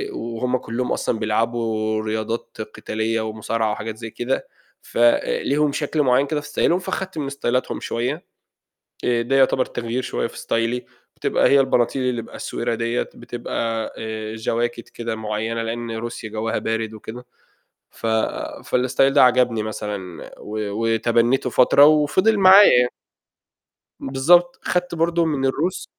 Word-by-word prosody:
وهم 120 +2 -2
كلّهم 125 +1 -3
أصلًا 115 - -1
بيلعبوا 110 0 0
رياضات 110 +1 -4 0.2
قتالية 110 +1 -2
ومصارعة 110 0 -2
وحاجات 110 +1 -5
زي 115 0 -7
كده، 120 +4 -2 0.3
فليهم 140 +5 +2
شكل 150 +1 -1
معيّن 130 +2 +3
كده 150 0 -1
في 150 - -10
ستايلهم 175 +4 +2
فخدت 190 -1 -4
من 140 -2 -2
ستايلاتهم 130 -2 -1
شوية، 125 +8 -3 0.8
آآ، 120 -1 +2
ده 135 +3 0
يعتبر 130 -1 +4
تغيير 120 +2 -3
شوية 125 - -2
في - - -12
ستايلي 115 +2 -1 0.3
بتبقى - - +2
هي 140 0 +5
البناطيل 130 0 +1
اللي 125 -2 -1
بأسورة 115 +1 -4
دِيَّة، 115 +1 -1
آآ، - - -1
بتبقى 115 -1 -4
آآ، 110 -1 -5
جواكت 115 +1 -2
كده 115 -1 -5
معيّنة 110 +1 -3
لأن 115 +1 -4
روسيا 115 0 -5
جوَّها 110 +1 -2
بارد 110 0 -2
وكده 115 +3 -9 0.7
ف 115 - -5 0.7
فالstyle 125 0 +1
ده 145 - +6
عَجَبني 125 -3 +3
مثلًا 105 -5 -6
و 105 +1 -7
وتبنّيتُه 115 +4 +1
فترة 130 +3 +6
وفِضِل 155 +8 +4
معايا 195 +1 +8
يعني. 125 0 +1 1.1
بالضبط، 175 +7 +3
خدت 180 -1 -1
برضه 170 +1 +1
من 145 -4 -1
الروس 165 +8 -1
120 Hz, 140 wpm, -22 LUFS, 115-135 Hz, 1.1 s, معايا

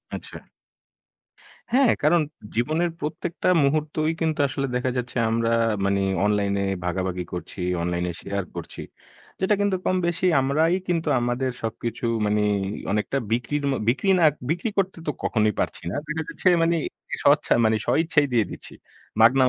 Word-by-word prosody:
আচ্ছা। - - -8 1.3
হ্যাঁ, 260 0 +5
কারণ 165 +3 +4 0.3
জীবনের 155 +9 +1
প্রত্যেকটা 160 +4 -2
মুহূর্তই 155 +2 +1
কিন্তু 160 -2 0
আসলে 135 0 -2
দেখা 125 +1 0
যাচ্ছে 125 0 -3
আমরা 115 0 +1 0.4
মানে 100 0 +1 0.2
অনলাইনে 100 -1 +1 0.2
ভাগাভাগি 90 0 -2
করছি, 90 +2 -7 0.2
অনলাইনে 90 +1 -1
শেয়ার 100 0 -3
করছি। - - -7 0.6
যেটা 190 +2 +3
কিন্তু 200 -2 +2
কমবেশি 175 -1 0 0.2
আমরাই 155 +5 +2
কিন্তু 170 -2 0
আমাদের 120 +2 -1
সবকিছু, 115 +1 -4 0.2
মানে 105 0 +2 0.5
অনেকটা 105 +6 0
বিক্রির 125 +5 -1
ম - - +1 0.2
বিক্রি 135 +11 +1
না, - - +3 0.3
বিক্রি 175 +7 0
করতে 190 -2 0
তো - - +2
কখনোই 110 -1 +2
পারছি - - -2
না। - - -4
দেখা 155 +1 -2
যাচ্ছে - - -2 0.2
মানে 170 +1 +2 0.5
স্বচ্ছা - - +4
মানে 110 0 +3
স্বইচ্ছাই 160 -2 +3
দিয়ে 115 -3 +3
দিচ্ছি। - - -9 0.5
মাগনা 125 +4 +6
135 Hz, 140 wpm, -24 LUFS, 110-165 Hz, 1.3 s, মাগনা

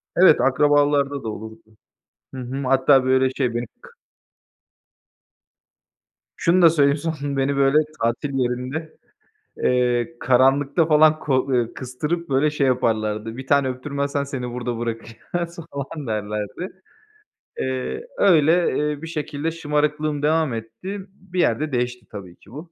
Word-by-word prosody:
Evet, 175 -4 +6
akrabalarda 145 0 +2
da 110 - -3
olurdu. 110 0 -10 0.6
Hı 130 - -6
hı. 135 +3 -5
Hatta 135 0 +4
böyle, 130 0 +3
şey, 125 -3 -2
beni 120 0 -1 0.2
k - - -14 2.5
Şunu 175 +2 +2
da 170 - +8
söyleyeyim; 145 -2 +3
son, 145 -3 -3
beni, 135 +1 +1
böyle, 140 +2 +3 0.2
tatil 120 +5 -1
yerinde, 130 +6 -3 0.7
eee, 120 -2 +1
karanlıkta 135 +5 +3
falan 155 0 +5
ko 135 -4 +1
ııı, 120 -3 0
kıstırıp, 150 +6 -4
böyle, 135 +3 +2
şey 145 -2 0
yaparlardı, 110 -2 -1
"Bir 130 - -8
tane 140 -1 +3
öptürmezsen 140 +2 -2
seni 125 -3 -5
burada 120 -1 -4
bırakacağız." 120 +10 -5
falan 140 0 -6
derlerdi. 105 - -4 0.8
Eee, 130 - -3
öyle, 165 -3 +4
eee, 145 0 -6
bir 165 - -6
şekilde 155 0 -3
şımarıklığım 150 -1 -1
devam 155 -3 +2
etti, 115 - -6
bir 185 -1 -8
yerde 150 +1 +1
değişti 125 -2 -2
tabii 95 -4 -9
ki 105 - -20
bu. 160 +5 -10
140 Hz, 130 wpm, -22 LUFS, 125-150 Hz, 2.5 s, da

